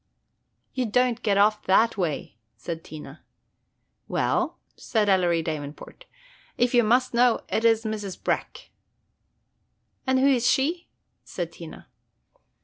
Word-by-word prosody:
"You 255 -2 -1
don't 250 +2 +1
get 205 -4 +1
off 210 +1 +3
that 225 +5 +3
way," 160 - -3 0.2
said 165 +7 -6
Tina. 155 0 -10 0.9
"Well," - - 0 0.2
said 215 -3 -1
Ellery 175 -3 +2
Davenport, 155 - -7 0.5
"if 245 +1 +2
you 240 -1 +5
must 245 +4 +2
know, 240 0 +3
it 225 - 0
's 225 0 +3
Mrs. 210 -4 -4
Breck." - - -3 1.4
"And 260 0 +3
who 260 - +3
is 255 -4 +3
she?" 330 +6 0 0.3
said - - -5
Tina. - - -11
220 Hz, 125 wpm, -25 LUFS, 180-245 Hz, 1.4 s, you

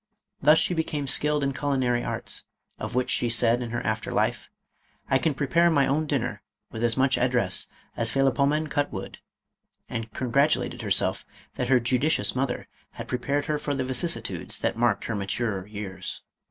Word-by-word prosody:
Thus 150 +3 +6
she 175 - +3
became 155 -3 -1
skilled 150 +2 +1
in 140 0 0
culinary 130 -4 0
arts, - - -2 0.4
of - - -5
which 125 0 +1
she 120 - +1
said 115 +1 +3
in 120 - -4
her 120 +1 -2
after 110 0 -1
life, - - 0 0.3
" - - -35
I 135 - +5
can 150 +1 0
prepare 165 +5 +3
my 145 -4 +4
own 150 +4 0
dinner 125 -8 -1 0.3
with 115 - -4
as 115 0 +2
much 130 0 +3
address 125 -7 +1 0.3
as - - 0
Philopcemen 140 +3 +2
cut 145 0 0
wood," 95 - -7 0.7
and 115 -1 -5
con 125 +1 -4
gratulated 140 +4 +2
herself - - +1 0.3
that 125 - -2
her 130 -1 +6
judicious 125 -2 +2
mother 130 -1 -1 0.3
had - - -7
pre 125 - -2
pared 140 +3 0
her 150 -1 -1
for 145 -1 -2
the 130 -1 -1
vicissitudes 150 +7 -1
that - - -1
marked 120 +1 +1
her 115 - -2
maturer 100 -1 -2
years. 100 -3 -5
130 Hz, 180 wpm, -26 LUFS, 115-145 Hz, 0.7 s, Thus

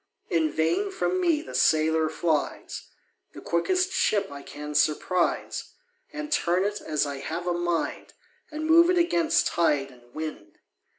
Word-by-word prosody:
In 160 -2 +2
vain 165 - 0
from 370 -1 -1
me 330 -4 +2
the - - -10
sailor 160 0 +3
flies, 160 -2 -2 0.5
The - - -9
quickest 370 - 0
ship 200 - +1
I 140 0 -8
can 150 +1 -8
surprise, 170 +4 0 0.4
And 300 -1 -6
turn 180 - +2
it 205 +1 -2
as 150 -1 0
I 140 -1 -4
have 165 +5 -5
a 175 - 0
mind, 175 -1 -2 0.4
And 310 +1 -5
move 335 +2 +6
it 365 - +3
against 340 -1 +2
tide 145 -5 +1
and 120 -1 -20
wind. 155 -10 -7
175 Hz, 155 wpm, -26 LUFS, -, 0.5 s, move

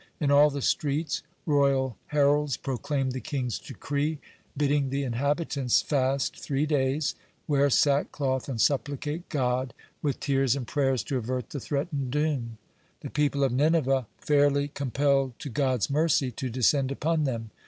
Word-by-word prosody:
In 145 -2 +1
all 145 +1 +7
the 140 -2 -4
streets 150 +1 0 0.2
royal 140 -4 +2
heralds 145 -1 +2
proclaimed 135 0 -2
the 130 - -4
king's 130 -5 -3
decree 145 +3 -3 0.4
bidding 145 -1 +1
the 140 +1 -1
inhabitants 140 +1 0
fast 135 -1 0
three 140 0 -1
days, 145 0 0 0.3
wear 145 -1 +3
sackcloth, 140 -1 +1
and 125 -4 -3
supplicate 145 +5 -1
God 130 -2 -1 0.3
with 145 -3 -1
tears 135 -2 +1
and 135 -3 -4
prayers 135 -2 0
to 140 - -2
avert 125 +1 -3
the 145 - -4
threatened 140 0 -2
doom. 135 -5 -1 0.4
The - - -7
people 145 -1 +1
of 135 - +2
Nineveh 135 -2 +2
fairly 145 -1 +2
compelled 135 -2 0
to 145 - -7
God's 130 -4 +1
mercy 145 -3 +2
to 130 +3 -4
descend 130 +3 +2
upon 155 +2 0
them. 115 -4 -3
140 Hz, 145 wpm, -27 LUFS, 130-145 Hz, 0.4 s, all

